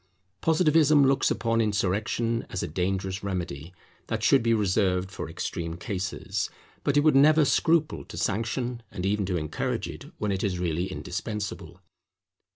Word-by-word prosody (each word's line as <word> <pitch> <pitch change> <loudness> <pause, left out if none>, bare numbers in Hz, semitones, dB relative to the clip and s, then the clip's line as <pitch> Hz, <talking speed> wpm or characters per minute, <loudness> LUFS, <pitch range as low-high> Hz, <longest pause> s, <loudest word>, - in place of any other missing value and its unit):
Positivism 155 -3 +4
looks 135 0 +3
upon 115 -1 +1
insurrection 110 +3 0
as - - -3
a - - -2
dangerous 95 +3 -2
remedy 85 -5 -4 0.4
that - - -2
should - - +5
be 115 0 +1
reserved 95 -2 +1
for - - -6
extreme 85 -1 -4
cases; 95 0 -3 0.3
but 145 0 +1
it - - +6
would 150 -1 +4
never 150 +2 +6
scruple 160 +2 +2
to - - -10
sanction 115 +3 -1
and 90 - -5
even 100 -1 0
to 90 -2 0
encourage 75 -1 -2
it - - -8
when 105 -1 -1
it 95 -1 -2
is 95 -4 0
really 85 0 -1
indispensable. 95 -3 -5
100 Hz, 155 wpm, -27 LUFS, 90-120 Hz, 0.4 s, it